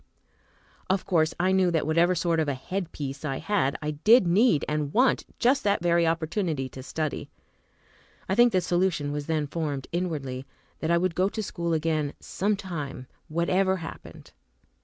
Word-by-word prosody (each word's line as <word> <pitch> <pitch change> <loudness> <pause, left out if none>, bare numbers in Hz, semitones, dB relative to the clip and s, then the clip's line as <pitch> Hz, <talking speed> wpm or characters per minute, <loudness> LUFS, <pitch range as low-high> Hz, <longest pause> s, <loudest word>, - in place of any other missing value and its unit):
Of 190 0 +1
course 160 -3 +2
I 185 +2 +2
knew 190 -1 +3
that 165 -2 0
whatever 170 +3 +3
sort 170 -1 +1
of 155 - +1
a 140 - 0
"head 180 +6 -4
piece" 140 0 -6
I 135 -3 -2
had, 190 -10 0
I 150 - -1
did 210 - +5
need 175 - +3
and 150 -1 -1
want 255 - +3
just 260 +3 +2
that 200 -3 +1
very 170 -1 +3
opportunity 165 -3 -1
to 130 - -9
study. 155 +3 -4 1.0
I - - 0
think 240 +3 +5
the 185 -3 +2
solution 175 -5 0
was 145 0 -4
then 155 -2 0
formed, 145 -3 -3
inwardly, 145 -7 -3 0.3
that 160 - -2
I 170 - +4
would 180 0 0
go 185 +3 +1
to 215 +1 -4
school 170 -3 -2
again, 155 -2 0
some 205 +2 -1
time, 160 -10 -6 0.2
whatever 185 +4 +1
happened. 165 -2 -10
170 Hz, 175 wpm, -26 LUFS, 150-185 Hz, 1.0 s, did